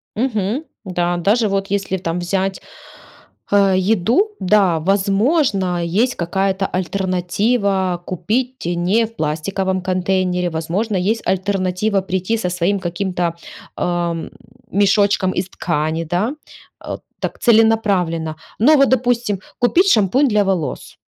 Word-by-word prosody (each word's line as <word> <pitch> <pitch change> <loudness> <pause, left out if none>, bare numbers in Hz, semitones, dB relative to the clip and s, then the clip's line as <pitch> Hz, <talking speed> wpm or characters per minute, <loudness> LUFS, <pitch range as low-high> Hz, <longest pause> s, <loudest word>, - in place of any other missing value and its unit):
Мгм. 225 +2 -1 0.2
Да, 175 -1 -1
даже 215 +6 +2
вот 195 0 -1
если 195 -1 -1
там 175 -1 -3
взять, 190 +2 -2 0.9
а, 200 -1 +4
еду, 225 - +2
да, 185 -4 +3
возможно, 195 - +1
есть 215 +9 +1
какая-то 190 +2 -1
альтернатива 190 +1 0
купить 235 +7 -2
не 175 +6 +1
в 230 +1 -12
пластиковом 185 +5 -2
контейнере. 185 -1 0
Возможно, 175 +7 -2
есть 210 +5 0
альтернатива 190 +1 0
прийти 190 +4 -1
со 180 -5 -2
своим 180 +3 0
каким-то, 175 -1 -2 0.4
ам, 170 -2 -2 0.4
мешочком 200 -1 +3
из 185 +1 -2
ткани, 160 -1 -2
да? 185 - -1 0.5
А, - - -6 0.2
так, - - -4
целенаправленно. 200 -9 +2 0.2
Ну 295 +6 +6
вот 275 -1 +4
допустим: 240 -5 +1 0.2
купить 360 +10 +3
шампунь 230 +7 +3
для 210 -3 +2
волос. 185 -6 -3
190 Hz, 115 wpm, -19 LUFS, 180-215 Hz, 0.9 s, Ну